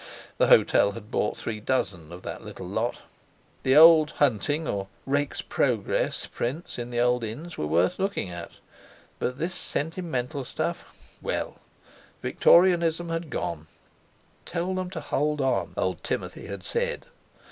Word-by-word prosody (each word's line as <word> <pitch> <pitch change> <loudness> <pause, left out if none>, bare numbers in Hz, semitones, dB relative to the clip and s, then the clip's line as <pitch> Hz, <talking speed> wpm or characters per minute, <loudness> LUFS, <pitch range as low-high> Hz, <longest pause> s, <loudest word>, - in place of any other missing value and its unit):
The - - +5
hotel 100 - +5
had 105 +2 -10
bought 105 - 0
three 110 -2 -4
dozen 95 -9 -1
of 90 +1 -9
that - - -6
little - - -8
lot! - - -2 0.6
The 130 +1 +3
old 160 0 +8
hunting 145 +4 +1
or 100 -1 -2 0.2
"Rake's 145 +1 -1
Progress" - - 0
prints 135 +4 -4
in 120 0 -4
the 120 -1 -2
old 125 0 +2
inns 150 +11 -6
were 75 - -2
worth 85 - +2
looking 195 - -1
at—but 85 +7 -8
this 170 +5 -2
sentimental 155 -5 -3
stuff—well, - - -4 0.6
Victorianism 170 -1 +4
had 165 -1 -3
gone! 80 - -3 0.8
"Tell 175 +2 -2
them 185 -1 -2
to 175 -4 -5
hold 150 +1 0
on!" 135 -1 0
old - - -1
Timothy - - -4
had - - -6
said. 485 +1 -1
145 Hz, 135 wpm, -26 LUFS, 110-165 Hz, 0.8 s, old